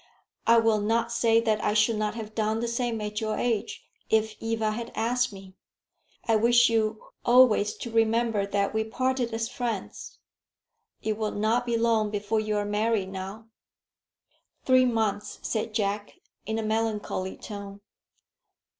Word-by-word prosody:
I 230 0 +7
will 225 -2 +3
not 230 +2 0
say 230 -1 +3
that 220 -2 0
I 210 - +1
should 215 +2 +3
not 210 0 -1
have 220 -2 -7
done 220 0 0
the 235 - -2
same 235 -1 -1
at 210 +1 -3
your 215 -1 -1
age, 230 -2 -2 0.2
if 220 0 +1
Eva 225 -1 0
had 230 +2 -5
asked 245 +2 +1
me. 195 -1 -12 0.7
I 225 -1 +4
wish 240 +2 +5
you 220 -1 0 0.2
always 240 -4 +5
to 235 - -7
remember 225 -2 +2
that 200 0 0
we 220 0 +1
parted 255 +2 -1
as 225 0 -2
friends. 230 -6 -5 0.9
It 215 -1 -1
will 215 -1 0
not 225 +4 0
be 235 -1 +1
long 225 -2 +2
before 210 +1 -1
you 215 -1 -1
are 205 - -1
married 210 -1 0
now." 195 +4 -7 1.2
"Three 255 -1 +5
months," 220 -4 -1
said 220 0 -2
Jack, 205 -1 -2 0.3
in 220 0 -1
a 225 - -2
melancholy 215 -3 -2
tone. 200 -1 -8
220 Hz, 155 wpm, -27 LUFS, 210-230 Hz, 1.2 s, I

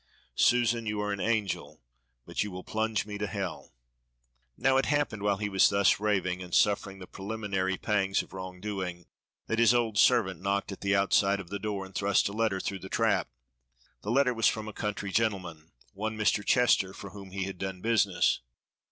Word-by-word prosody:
Susan, 120 - +2
you 105 0 -2
are 105 0 -1
an 100 - -5
angel, 110 -4 -1 0.5
but - - -3
you 105 - -5
will 90 -1 -7
plunge 110 -3 -1
me 105 -1 -6
to 105 - -1
hell." 95 -3 -5 0.9
Now 135 0 +3
it 135 - +1
happened 145 -8 0
while 100 -1 +1
he 105 +1 -2
was 95 -1 +4
thus 100 -1 +3
raving 95 -4 0
and 90 -2 -4
suffering 100 -1 +2
the 95 - -9
preliminary 95 -2 -3
pangs 95 -2 +1
of - - -18
wrong 95 -1 -7
doing 95 -4 -4 0.4
that 115 - -1
his 115 +1 +5
old 115 -3 +1
servant - - +3
knocked 100 +1 -1
at 95 - -8
the 100 0 +2
outside 100 0 +3
of 90 -3 -8
the 100 - -4
door 100 -2 -3
and 95 - -14
thrust 100 0 +2
a 100 - -5
letter 110 -3 0
through 95 0 -4
the 95 - -9
trap; - - +1 0.7
the 105 - -6
letter 125 +1 +3
was 115 -1 +2
from 110 -1 -1
a 110 - -6
country 100 -1 -3
gentleman, 90 -8 -1 0.2
one 110 +2 -4
Mr. 105 -1 +2
Chester, 100 -6 +3
for 100 - -9
whom 100 -2 -10
he 95 +1 -3
had 95 -1 -6
done 95 -1 -4
business. 105 -3 +2
100 Hz, 195 wpm, -29 LUFS, 95-110 Hz, 0.9 s, his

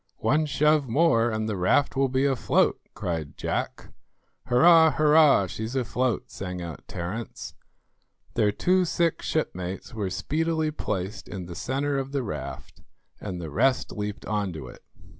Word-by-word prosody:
"One 155 +2 +2
shove 150 0 +2
more 120 -3 +3
and 110 -1 -2
the 110 - -2
raft 95 +10 +2
will 135 0 +2
be 130 +2 +1
afloat," 135 -4 +2
cried 80 -4 -4
Jack. - - -4 0.5
"Hurrah, 160 +5 +6
hurrah, 150 -7 +5
she's 110 +7 -5
afloat," 125 -1 -1
sang 90 -2 -5
out 85 -4 -8
Terence. 95 +6 -6 0.8
Their 105 - +2
two 185 - +2
sick 170 -1 0
shipmates 95 - -3
were 105 -4 -2
speedily 160 - -1
placed 105 -7 -4
in 95 -3 -6
the 85 - -8
centre 140 +7 -1
of 135 +1 -5
the 140 -2 0
raft, 105 - -7 0.4
and 95 -4 -5
the 80 -3 -6
rest 130 - +1
leaped 105 -1 -5
on 105 -3 -1
to 75 -6 -8
it. - - -14
120 Hz, 150 wpm, -26 LUFS, 95-150 Hz, 0.8 s, Hurrah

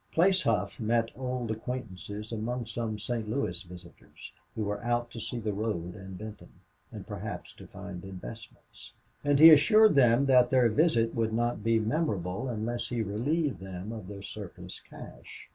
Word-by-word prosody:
Place 185 +3 +4
Hough 100 - 0
met 115 +1 +1
old 125 -3 -3
acquaintances 110 -3 -6
among 115 +2 -3
some 115 -1 -3
St. 110 0 -3
Louis 105 -8 -1
visitors, 90 -3 -13 0.2
who 110 - -1
were 105 +2 -3
out 120 0 0
to 115 - -7
see 120 - -4
the 110 -2 -2
road 100 -5 -3
and 95 -2 -9
Benton, 110 +1 -10 0.4
and - - -8
perhaps - - -6
to - - -13
find 95 -2 -8
investments; 95 +4 -11 0.3
and 145 -1 +3
he 160 +3 +11
assured 215 +9 +7
them 130 -1 +5
blandly 135 - +3
that 125 -1 +6
their 125 -2 +4
visit 115 -3 +2
would 110 -1 0
not 120 -2 0
be 115 +1 +3
memorable 110 - -1
unless 115 +1 -3
he 120 -2 -1
relieved 130 - -1
them 95 +2 -7
of 110 -5 -7
their 100 0 -8
surplus - - -8
cash. - - -12
115 Hz, 170 wpm, -29 LUFS, 105-125 Hz, 0.4 s, he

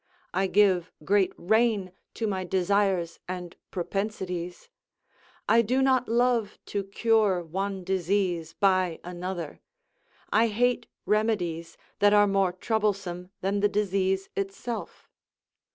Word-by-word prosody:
I 190 +1 +1
give 185 -3 +3
great 200 -1 +3
rein 215 -1 +2 0.2
to 225 - -2
my 190 -3 -1
desires 185 -1 +1
and 180 -1 -6
propensities; 180 - -4 0.8
I 230 - +6
do 245 +4 +1
not 260 -2 +3
love 235 -2 +1 0.2
to 200 -1 0
cure 205 -3 +2
one 190 +3 -3
disease 180 -3 0
by 185 -4 +2
another; 175 -2 -5 0.7
I 230 +2 +5
hate 245 +3 +1 0.2
remedies 180 -7 0 0.2
that 205 0 +5
are 205 0 +6
more 195 -2 +2
troublesome 195 -3 -2
than 195 +2 0
the 205 +1 +3
disease 195 -2 0
itself. 195 +4 -5
195 Hz, 115 wpm, -27 LUFS, 180-210 Hz, 0.8 s, I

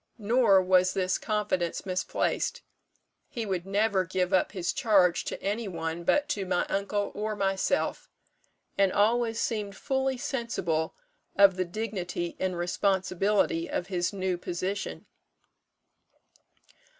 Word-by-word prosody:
Nor 215 -3 +4
was 185 0 +3
this 185 -1 0
confidence 205 -5 -1
misplaced. 195 - -1 0.7
He 235 -5 -4
would 190 -2 -3
never 200 -1 +2
give 185 +1 -1
up 185 - +3
his 180 -4 -2
charge 190 -6 +3
to - - -4
any 210 +3 -1
one 165 -2 -4
but 290 +11 +2
to 205 -9 -1
my 185 -1 0
uncle 200 +1 -1
or 215 +1 -3
myself; 195 +7 0 0.7
and 195 -1 +4
always 225 +2 +2
seemed 210 -3 -2
fully 265 -1 -1
sensible 235 - -2 0.4
of 200 -2 +6
the 185 0 -1
dignity 180 -3 -4
and 185 -1 -1
responsibility 185 0 +1
of 180 - -3
his 175 -2 0
new 190 -3 -2
position." 185 +3 -4
195 Hz, 125 wpm, -28 LUFS, 180-215 Hz, 0.7 s, of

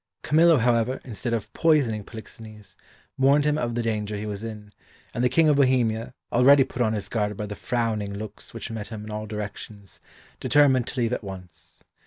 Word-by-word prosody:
Camillo, 165 +1 +5
however, 120 +1 +1
instead 120 0 -5
of 115 -3 -3
poisoning 140 -10 +2
Polixenes, 110 -1 -11 0.4
warned 140 +2 +4
him 150 0 +2
of 120 -5 -2
the 120 - -1
danger 105 -2 -2
he 105 - -5
was 105 0 -5
in, 105 -2 -8 0.4
and 120 - -1
the 125 - +4
King 160 +5 +4
of 150 -2 +4
Bohemia, 125 -3 +1 0.2
already 135 +3 +6
put 125 - -6
on 110 -2 +2
his 105 -2 -3
guard 105 -3 -2
by 105 - -3
the 105 0 -6
frowning 110 -5 -2
looks 105 0 -8
which 115 0 -7
met 110 -2 -5
him 110 -2 -7
in 110 - -8
all 105 0 -5
directions, 105 -1 -7 0.4
determined 135 -4 +3
to 130 - -3
leave 120 0 +1
at 125 - -3
once. 90 -4 -10
115 Hz, 195 wpm, -25 LUFS, 105-130 Hz, 0.4 s, already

